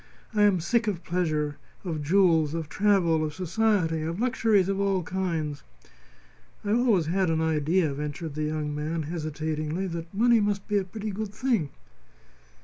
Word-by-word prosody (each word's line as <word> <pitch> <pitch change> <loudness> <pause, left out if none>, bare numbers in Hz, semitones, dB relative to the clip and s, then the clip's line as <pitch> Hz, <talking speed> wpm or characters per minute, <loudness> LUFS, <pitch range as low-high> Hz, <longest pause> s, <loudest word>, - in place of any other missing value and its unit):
I 210 - +2
am 205 -3 +5
sick 225 +7 +1
of 185 -5 -2
pleasure, 155 -5 -1 0.3
of 160 -4 -3
jewels, 165 -2 +3
of 165 -2 -3
travel, 185 -6 +2
of 155 -1 -3
society, 185 -3 +1
of 165 +4 -3
luxuries 225 -6 +2
of 195 0 -1
all 195 -2 +1
kinds." 165 -6 -2 1.0
"I 205 - 0
always 225 -7 +3
had 185 +2 +1
an 160 -1 +1
idea," 160 0 +1
ventured 150 +2 -5
the 155 - -4
young 150 -1 -2
man, 155 +2 -2
hesitatingly, 155 +2 -3
"that 170 -2 -5
money 230 +3 +4
must 205 -1 -1
be 205 -1 +2
a - - -2
pretty 215 +3 -5
good 210 +1 -5
thing." 230 - 0
175 Hz, 160 wpm, -27 LUFS, 155-200 Hz, 1.0 s, am